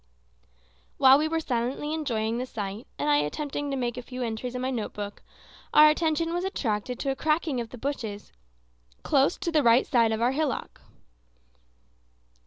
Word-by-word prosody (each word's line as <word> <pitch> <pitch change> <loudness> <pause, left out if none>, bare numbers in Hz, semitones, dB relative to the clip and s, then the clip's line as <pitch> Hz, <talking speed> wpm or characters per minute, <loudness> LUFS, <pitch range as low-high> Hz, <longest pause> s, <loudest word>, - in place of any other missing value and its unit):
While 265 +1 +7
we 310 - +1
were 325 +1 0
silently 265 +2 -2
enjoying 235 -7 -1
the 255 - -3
sight, 210 0 -6
and 145 - -2
I 145 -1 +4
attempting 285 - -2
to 275 - -2
make 245 -1 -2
a - - -3
few 250 +1 -6
entries 235 +2 -4
in 250 - -3
my 260 - -1
note 230 -5 -3
book, 205 0 -6 0.5
our 305 0 +9
attention 330 +1 0
was 350 +1 -1
attracted 245 - -2
to 275 - 0
a - - -2
cracking 305 -3 0
of 230 - -7
the 250 - -10
branches 225 -6 -5 0.7
close 280 +3 +2
to 355 -3 -3
the 310 -2 +3
right 235 0 +5
side 230 -3 +3
of 220 - -1
our 240 +2 +2
hillock. 295 0 -3
255 Hz, 180 wpm, -27 LUFS, 230-300 Hz, 0.7 s, our